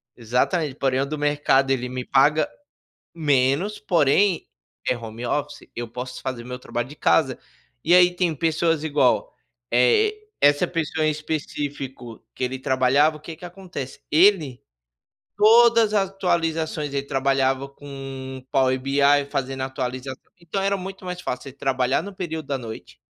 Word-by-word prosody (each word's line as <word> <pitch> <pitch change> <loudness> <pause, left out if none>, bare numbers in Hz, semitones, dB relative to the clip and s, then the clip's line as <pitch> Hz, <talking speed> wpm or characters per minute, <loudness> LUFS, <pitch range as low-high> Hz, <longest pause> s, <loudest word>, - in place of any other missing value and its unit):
exatamente, 130 - 0
"Porém 135 -1 0
o - - 0
do 155 +2 -4
mercado 145 -2 +2
ele 125 -2 -1
me 125 0 -5
paga 150 +3 +3 0.7
menos, 145 +6 +1
porém, 170 +4 +2 0.4
é 125 - +2
home 115 +1 -7
office, 145 +3 -3
eu 120 - -3
posso 125 +2 -7
fazer 130 -3 -4
meu 125 +1 -6
trabalho 120 -1 -4
de 145 - -12
casa." 135 -5 +2 0.5
E 170 - +5
aí 180 0 +7
tem 175 -2 0
pessoas 165 +1 +1
igual, 145 -4 +2 0.4
eh, 275 - +4 0.3
essa 145 0 +4
pessoa 160 -2 -1
em - - +3
específico 145 -6 -5
que - - -7
ele 130 +1 -3
trabalhava, 135 +3 +2
o - - -13
que 160 +1 -9
que 180 - -13
acontece. 175 -7 -8
Ele, 160 -6 +4 0.8
todas 225 +1 +6
atualizações 165 -6 -1
ele 140 - 0
trabalhava 135 0 +1
com 135 -2 -8
Power 130 -1 +2
BI 135 +2 -1 0.3
fazendo 135 0 -3
atualização 130 0 -4 0.2
então 170 +3 -3
era 200 0 +1
muito 195 0 -8
mais 180 0 -5
fácil 125 -8 -4
você 135 - -9
trabalhar 130 -1 0
no 200 0 -8
período 160 -5 -5
da 140 -1 -1
noite 115 -3 -9
140 Hz, 150 wpm, -23 LUFS, 130-165 Hz, 0.8 s, aí